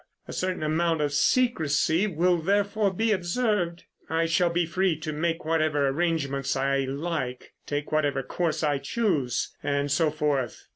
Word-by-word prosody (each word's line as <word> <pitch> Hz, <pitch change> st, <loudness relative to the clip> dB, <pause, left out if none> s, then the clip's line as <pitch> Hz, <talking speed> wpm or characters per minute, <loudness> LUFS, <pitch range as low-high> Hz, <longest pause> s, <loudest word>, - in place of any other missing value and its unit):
A -, -, -7 dB
certain 185 Hz, -3 st, -2 dB
amount 165 Hz, +1 st, +1 dB
of 145 Hz, -1 st, 0 dB
secrecy 165 Hz, -, +2 dB
will, 175 Hz, -1 st, +2 dB
therefore, 200 Hz, +3 st, +1 dB
be 220 Hz, +4 st, 0 dB
observed. 185 Hz, -2 st, 0 dB, 0.3 s
I 165 Hz, +1 st, +1 dB
shall 170 Hz, +1 st, +2 dB
be 170 Hz, 0 st, +1 dB
free 180 Hz, 0 st, 0 dB
to 155 Hz, -1 st, -4 dB
make 165 Hz, +2 st, -2 dB
whatever 155 Hz, -3 st, +1 dB
arrangements 140 Hz, -3 st, -1 dB
I 135 Hz, 0 st, +1 dB
like, 140 Hz, -2 st, -4 dB
take 145 Hz, 0 st, -3 dB
whatever 145 Hz, -3 st, +1 dB
course 165 Hz, +3 st, -2 dB
I 145 Hz, -2 st, +1 dB
choose, 145 Hz, -, -1 dB
and 140 Hz, 0 st, -1 dB
so 160 Hz, +2 st, +3 dB
forth. 145 Hz, -5 st, -2 dB
160 Hz, 150 wpm, -26 LUFS, 145-175 Hz, 0.3 s, so